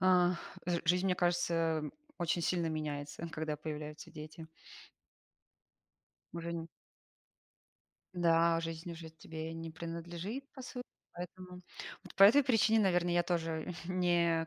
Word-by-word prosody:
Ах, 180 -1 +5 0.3
жи 175 -1 +1
жизнь, 180 +3 +3
мне 185 - +3
кажется, 170 -3 +2 0.4
очень 170 0 +1
сильно 170 -1 +1
меняется, 150 0 -3
когда 155 -1 -2
появляются 150 0 -6
дети. 155 0 -8 1.9
Уже 170 0 -4
нь 165 -1 -3 1.5
Да, 170 -1 +4
жизнь 165 +1 -4
уже 165 -1 -7
тебе 160 0 -6
не 165 0 -5
принадлежит, 170 +8 -5
по 260 - -9
сути. 250 0 -6 0.3
Поэтому, 180 +1 -8 0.4
вот - - -12
по 195 - +5
этой 240 +9 +9
причине, 225 -3 +4
наверно, 175 -3 +3
я 175 0 +4
тоже 165 -1 -1
не 170 -2 +2
170 Hz, 125 wpm, -34 LUFS, 160-180 Hz, 1.9 s, этой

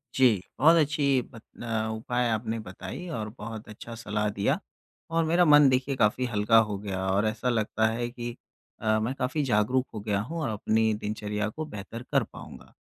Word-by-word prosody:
जी। 120 -8 +4 0.2
बहुत 160 +4 +7
अच्छी 140 -3 +2
बत 115 - -12 0.2
न - - -6 0.3
उपाय 120 +2 -1
आपने 110 0 -1
बताई 95 - -7
और 105 0 -4
बहुत 110 0 -7
अच्छा 115 +2 -9
सलाह 105 -2 -2
दिया 100 -1 0 0.5
और 165 0 +3
मेरा 170 +2 +4
मन 150 -2 +7
देखिए 130 +1 +1
काफ़ी 115 +2 +2
हल्का 115 -1 +3
हो 100 - -2
गया 95 -2 -3
और 100 +3 +2
ऐसा 110 +3 -1
लगता 110 -1 +1
है 120 +2 -2
कि 120 -1 -6 0.5
अ, 110 0 +2
मैं 110 +4 -1
काफ़ी 135 +4 -1
जागरूक 125 +2 +2
हो 110 - -4
गया 100 -1 -1
हूँ 160 +10 -5
और 150 - -1
अपनी 110 +1 +1
दिनचर्या 105 0 -3
को 155 +8 -5
बेहतर 105 -2 -8
कर - - +3
पाऊँगा। - - -12
115 Hz, 185 wpm, -27 LUFS, 105-130 Hz, 0.5 s, बहुत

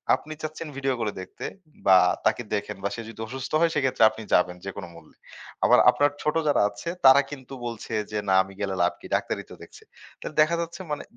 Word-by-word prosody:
আপনি 155 +1 -9
চাচ্ছেন 155 +1 -5
ভিডিও 135 -1 0
করে 105 -2 -1
দেখতে 95 - -9 0.4
বা 95 -1 +7 0.3
তাকে 110 +2 +2
দেখেন 105 0 -2
বা 100 - 0
সে 115 - -6
যদি 110 - -12
অসুস্থ 130 +1 -6
হয় 165 -1 +3
সেক্ষেত্রে 135 -5 +2
আপনি 110 +1 -9
যাবেন। 90 0 +3
যেকোন 100 -2 -6
মূল্যে। 80 -2 -17 0.5
আবার - - +6
আপনার 145 0 +3
ছোট 150 +1 0
যারা 145 - +3
আছে 100 +11 -7 0.2
তারা 135 +2 +9
কিন্তু 135 -1 -9
বলছে 115 -1 -6 0.2
যে, 105 - -2
না 95 - +4
আমি 95 +1 -13
গেলে 95 -1 -1
লাভ 85 - +2
কি - - -13
ডাক্তারি - - -2
তো - - -9
দেখছে। - - -15 0.4
তাহলে 155 - -7
দেখা 155 +2 +3
যাচ্ছে 170 +2 -6
মানে 150 - -3
125 Hz, 210 wpm, -25 LUFS, 100-150 Hz, 0.5 s, তারা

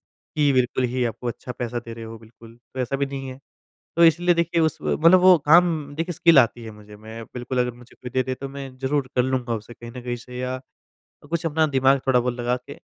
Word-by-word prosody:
कि 145 -2 0
बिल्कुल 125 0 +1
ही 130 -1 0
आपको 120 +1 -4
अच्छा 120 +1 -5
पैसा 120 0 -3
दे 115 - -7
रहे 115 0 -9
हो 115 0 -8
बिल्कुल। 115 +1 -16 0.2
तो - - -5
ऐसा 125 +2 -2
भी 140 - 0
नहीं 135 -1 -6
है। 130 +1 -10 0.6
तो 170 - +7
इसलिए 175 +2 +4
देखिए 170 0 +1
उस 160 - +1
मतलब 165 +4 +4
वो 185 -1 +7
काम 170 +3 +6 0.2
देखिए 165 +3 -3
स्किल 170 -3 +6
आती 120 -1 +1
है 110 - -8
मुझे। 105 0 -14
मैं 110 +2 -9
बिल्कुल 125 +1 -3
अगर 125 0 +1
मुझे 120 0 -17
कोई 125 - -9
दे-दे 130 0 0
तो 135 - -5
मैं 140 0 -7
ज़रूर 135 0 -1
कर 125 - +3
लूँगा 125 -2 -1
उसे 110 +2 -9
कहीं 120 0 -11
न - - -6
कहीं 120 0 -3
से 125 +1 -11
या 130 0 -3 0.7
कुछ 170 0 -1
अपना 160 0 +2
दिमाग 135 -1 +3
थोड़ा-बहुत 125 -2 +2
लगा 120 +1 0
के 125 - -12
130 Hz, 230 wpm, -23 LUFS, 120-150 Hz, 0.7 s, तो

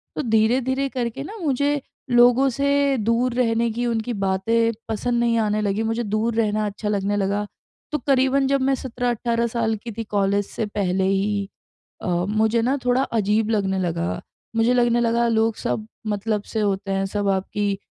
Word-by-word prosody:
तो - - -1
धीरे-धीरे 255 +5 +2
करके 250 +1 -3
ना 425 +8 -8
मुझे 285 -3 0 0.3
लोगों 245 +2 +5
से 280 +1 +1
दूर 230 +3 +1
रहने 230 -1 +2
की 240 +2 -2
उनकी 230 +1 -1
बातें 205 +4 +1 0.2
पसंद 235 +2 0
नहीं 235 -1 +2
आने 215 0 +1
लगीं। 205 +2 0
मुझे 225 +2 -1
दूर 215 +2 -1
रहना 215 -1 +1
अच्छा 210 +1 -4
लगने 205 0 0
लगा। 200 +1 0 0.5
तो 300 - +1
करीबन 270 0 +3
जब 275 -1 +1
मैं 270 0 +2
17-18 240 -2 -1
साल 225 -1 0
की 235 - -5
थी 225 - -2
कॉलेज 200 0 +1
से 220 - -3
पहले 190 -2 -1
ही 200 +1 0 0.5
अ, - - -3 0.2
मुझे 220 +2 +2
ना 265 +4 +1
थोड़ा 250 +2 +3
अजीब 215 -1 0
लगने 195 -3 0
लगा 170 -1 -2 0.3
मुझे 230 +2 +3
लगने 240 -1 +3
लगा 235 0 +2
लोग 225 -1 +2
सब 215 0 -3 0.2
मतलब 210 0 -1
से 220 - -4
होते 195 -1 -1
हैं, 195 0 0
सब 200 0 -1
आपकी 200 +1 -1
225 Hz, 175 wpm, -23 LUFS, 205-245 Hz, 0.5 s, लोगों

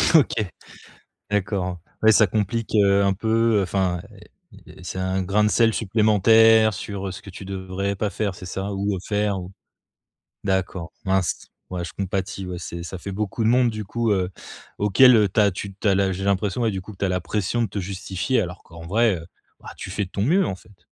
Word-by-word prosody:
OK, 155 - +5 1.0
d'accord. 95 -3 -1 0.3
Ouais 110 - +7
ça 110 0 +5
complique, 110 +3 -1
heu, 100 -1 +4
un 100 0 +3
peu, 115 +3 +1
heu, - - +1
enfin 90 -2 0
et - - -16 0.5
et - - -12
c'est 95 - -5
un 95 +1 0
grain 100 +3 +2
de 105 - +3
sel 115 0 +3
supplémentaire 110 +1 +5
sur, 100 0 -5
heu, - - -4
ce 95 +1 -9
que 100 - -12
tu 95 - -9
devrais 95 +1 -3
pas 105 +2 -1
faire, 100 -1 -2
c'est 90 - -10
ça? 95 +2 -4
Ou, 100 +1 -1
heu, - - -5
faire, 105 -2 0
ou 90 0 -8 0.9
d'accord, 95 -3 -1
mince, 95 -2 0 0.2
ouais, 90 -1 -3
je 85 - -7
compatis, 95 0 -3
ouais, 90 -1 -5
c'est, 85 0 -6
ça 90 +2 -7
fait 100 +3 -6
beaucoup 105 +3 -2
de - - +4
monde 125 0 +4
du 110 -1 -5
coup, 115 +3 -1
heu, 95 -2 0 0.5
auquel, 115 +6 +6
heu, 105 -2 +4
tu 100 - +1
as 100 -1 +5
tu 100 +1 -7
tu 105 +2 -1
as 100 - +4
la 95 0 +2
j'ai 95 +1 -4
l'impression, 100 +3 0
ouais, 115 - +2
du 95 -2 -4
coup 100 +4 -11
que 95 - -17
tu - - -1
as - - +1
la 90 0 0
pression 105 +6 -1
de 115 - 0
te 100 - -5
justifier 95 +5 -1
alors 90 -3 -5
qu'en 85 0 -12
vrai, 110 +4 +3
heu, 80 0 -9 0.3
bah, - - -10
tu - - -7
fais 100 - -1
de - - -17
ton 100 - -2
mieux 175 - +3
en 95 - -3
fait. 95 0 -22
100 Hz, 230 wpm, -23 LUFS, 95-110 Hz, 1.0 s, Ouais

